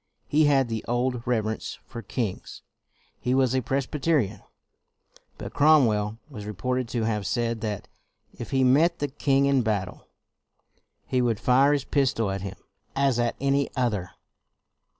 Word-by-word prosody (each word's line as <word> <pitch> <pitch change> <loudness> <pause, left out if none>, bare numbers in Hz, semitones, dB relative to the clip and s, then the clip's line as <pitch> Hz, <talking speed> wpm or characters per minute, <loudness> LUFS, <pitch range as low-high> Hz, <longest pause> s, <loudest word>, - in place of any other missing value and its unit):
He 155 +1 +3
had 135 -3 +3
the 115 -2 -3
old 125 0 0
reverence 110 -3 -1
for 115 - -8
kings. 110 -2 -4 0.6
He 125 +1 0
was 130 -2 +3
a 130 - +2
Pres 135 +3 -1
byterian. 135 - 0 1.0
But - - -7
Cromwell 115 -9 +4
was 105 -9 -9
reported 125 +4 -2
to 115 -1 -2
have 105 -2 -1
said 115 -2 -1
that 105 -3 -4 0.3
" - - -45
if 120 - -6
he 135 -1 +2
met 145 +7 +4
the 145 - -2
king 140 +1 +2
in 140 -2 +3
battle, 105 -5 -3 1.0
he 130 - 0
would 115 -4 +1
fire 130 +4 +4
his 145 -2 +1
pistol 125 -8 +1
at 95 0 -3
him 95 0 -6 0.4
as 135 -3 +2
at 120 -1 -1
another.'' 130 -8 0
125 Hz, 150 wpm, -26 LUFS, 110-135 Hz, 1.0 s, Cromwell